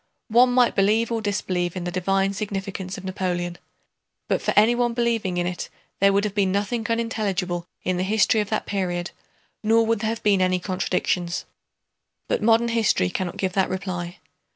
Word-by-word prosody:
One 245 +3 +5
might 245 -1 +4
believe 215 +4 +2
or 230 -1 -1
disbelieve 185 -4 -1
in 180 - -4
the 175 - -3
divine 195 +2 +1
significance 195 -2 -4
of 190 - -9
Napoleon, 175 -2 -2 0.7
but - - 0
for - - 0
anyone 240 +2 +4
believing 230 -6 0
in 175 - 0
it 180 0 -4 0.3
there 195 0 +5
would 200 +1 +2
have 210 -2 -2
been 200 -2 +1
nothing 210 +3 -1
unintelligible 200 -7 -1 0.2
in 185 0 0
the 180 - 0
history 215 +2 +3
of 205 - -4
that 215 - -1
period, 180 -3 -2 0.5
nor 225 +1 +4
would 225 -1 +1
there 220 0 -1
have 230 0 -4
been 200 -2 +3
any 185 0 +2
contradictions. 180 -1 -1 0.8
But - - 0
modern 230 +2 +4
history 220 - +2
cannot 180 -2 -3
give 190 -2 -1
that 190 -1 +1
reply. 180 -1 -4
195 Hz, 175 wpm, -24 LUFS, 185-220 Hz, 0.8 s, One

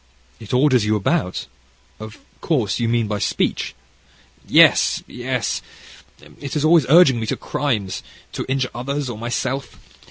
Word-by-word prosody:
"It 110 - -10
orders 125 -2 +3
you 105 +1 +1
about 95 -2 -1 0.5
of 110 0 -9 0.2
course 125 - 0
you 115 -1 0
mean 115 -2 +1
by 105 -1 -3
speech?" - - -1 0.7
"Yes, - - +5
yes; 125 -2 -3 0.8
it 140 0 -6
is 150 0 0
always 160 -4 +4
urging 150 -6 +6
me 110 - -4
to - - -2
crimes, 115 -9 -2 0.3
to - - -4
injure 130 -1 -1
others, 135 +3 -3
or 110 - -7
myself. 120 +4 -3
125 Hz, 145 wpm, -20 LUFS, 110-135 Hz, 0.8 s, urging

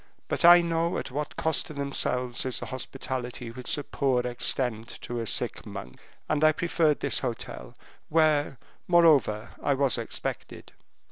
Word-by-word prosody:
But - - -1
I 175 +1 +9
know 170 0 0
at - - -5
what 150 +3 -4
cost 160 -1 0
to 155 - -9
themselves 125 -3 -1
is 130 -2 -1
the - - -5
hospitality 130 -2 -5
which 125 +1 -2
the 145 - -4
poor 130 -4 0
extend 120 -2 0
to 120 0 -4
a 115 - -3
sick - - -2
monk, 65 0 -9 0.3
and 150 0 0
I 155 0 +6
preferred 160 -2 +1
this - - +2
hotel, - - -5 0.3
where, 150 -4 +2 0.3
moreover, 150 - +4
I 140 - +2
was 135 -3 +1
expected." 115 - -5
135 Hz, 155 wpm, -27 LUFS, 125-155 Hz, 0.3 s, I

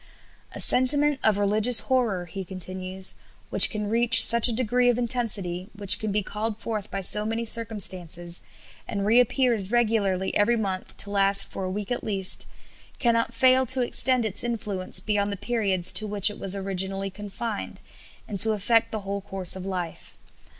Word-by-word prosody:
"A - - -8
sentiment 285 +2 +3
of 215 -2 +1
religious 210 +3 +3
horror," 230 -9 -2
he 190 +3 -8
continues, 185 +1 -6 0.4
"which - - +9
can 210 -2 -5
reach 230 +2 +7
such 235 0 +3
a - - +1
degree 245 +1 0
of 240 - 0
intensity, 210 -7 -1
which 200 -2 +4
can 215 -1 -4
be 205 0 -1
called 215 +2 -6
forth 215 -3 -6
by 195 - -5
so 210 +3 +2
many 225 +2 -4
circumstances, 185 -7 -1 0.5
and 200 -2 -5
reappears 235 -2 +1
regularly 210 -6 -1
every 235 +3 +1
month 190 -4 -6
to 200 - -2
last 195 0 +2
for 190 - -6
a - - -5
week 205 +4 -7
at 245 - -4
least, 195 -3 +1 0.5
cannot 230 -1 -1
fail 260 +1 +2
to 260 +2 +2
extend 250 0 +5
its 205 -3 +1
influence 205 -6 -3
beyond 205 +1 -2
the 200 - -6
periods 195 -6 -1
to 215 - +1
which 205 0 +3
it - - -12
was 195 0 -2
originally 195 0 -2
confined, 205 +2 -8 0.5
and 200 - -6
to 220 +2 +4
affect 225 +2 0
the 215 - -6
whole 200 0 -6
course 190 -2 0
of 190 0 -8
life. 180 -3 -7
205 Hz, 170 wpm, -23 LUFS, 195-230 Hz, 0.5 s, which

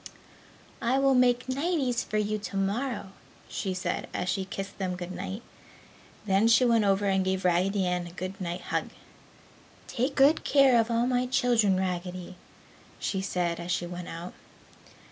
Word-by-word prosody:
"I 245 +3 +2
will 275 0 +4
make 250 -1 +3
nighties 270 -3 0
for 215 - -3
you 210 0 0
tomorrow!" 205 +2 -2 0.4
she 190 - -3
said 185 - -2
as 180 - -2
she 190 0 -1
kissed 195 +1 -7
them 185 -2 -2
good 180 0 -6
night. 190 +4 -5 0.8
Then 195 +2 +3
she 230 +2 +5
went 230 -3 +3
over 195 +1 +2
and 190 -1 +2
gave 190 0 -1
Raggedy 185 +2 +2
Ann 180 -1 -1
a - - -10
good 185 +2 -6
night 175 0 -3
hug. - - -2 1.0
"Take 260 +4 -2
good 285 +3 +5
care 270 -4 +5
of 225 - -4
all 235 0 +2
my 250 0 +1
children, 235 -6 +3
Raggedy!" 180 -1 -4 0.6
she 190 - -2
said 175 -3 -1
as 170 +1 -4
she 175 - 0
went 175 0 -7
out. 170 +2 -7
195 Hz, 165 wpm, -28 LUFS, 185-245 Hz, 1.0 s, she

